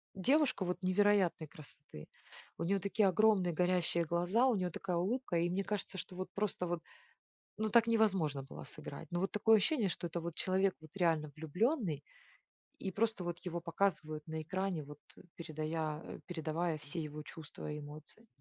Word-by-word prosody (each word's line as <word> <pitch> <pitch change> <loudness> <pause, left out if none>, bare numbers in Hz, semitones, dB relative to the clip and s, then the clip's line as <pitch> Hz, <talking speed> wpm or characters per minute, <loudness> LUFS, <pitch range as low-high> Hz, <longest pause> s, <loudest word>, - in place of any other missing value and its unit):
девушка 260 +1 +3 0.2
невероятной 185 -3 +3
красоты. 145 - -12 0.5
У - - -2
нее 195 +4 +2
такие 200 +2 +2
огромные 190 -2 +4
горящие 175 0 +2
глаза, 175 +9 +2
у 250 - +3
нее 180 -3 -1
такая 180 0 -2
улыбка. 200 +2 0
И 170 +1 +2
мне 190 +3 0
кажется, 200 -2 -3
что 180 - -7
вот 185 +1 -4
просто 200 -3 -1
вот, 175 -1 -2 0.8
ну, 215 0 0
так 230 +1 +6
невозможно 195 -11 +2
было 135 - -9
сыграть. 145 +3 -8
Но 175 - -1
вот 195 - 0
такое 220 +1 +5
ощущение, 220 +1 +2
что 175 - -3
это 170 +1 -3
вот 170 0 -4
человек 190 +2 +2
вот 155 - -13
реально 165 -5 +1
влюбленный, 160 - 0 0.8
и 190 - -3
просто 215 -1 +1
вот 175 -1 -3
его 175 -2 -3
показывают 155 -3 -1
на 160 0 -3
экране, 185 +1 -2
вот 145 0 -11 0.4
передая 155 -1 -3
э, - - -8
передавая 165 -1 -1
все 150 +3 -4
его 150 0 -6
чувства 150 -1 -7
и 150 - -4
эмоции. 150 +10 -11
175 Hz, 170 wpm, -35 LUFS, 155-200 Hz, 0.8 s, так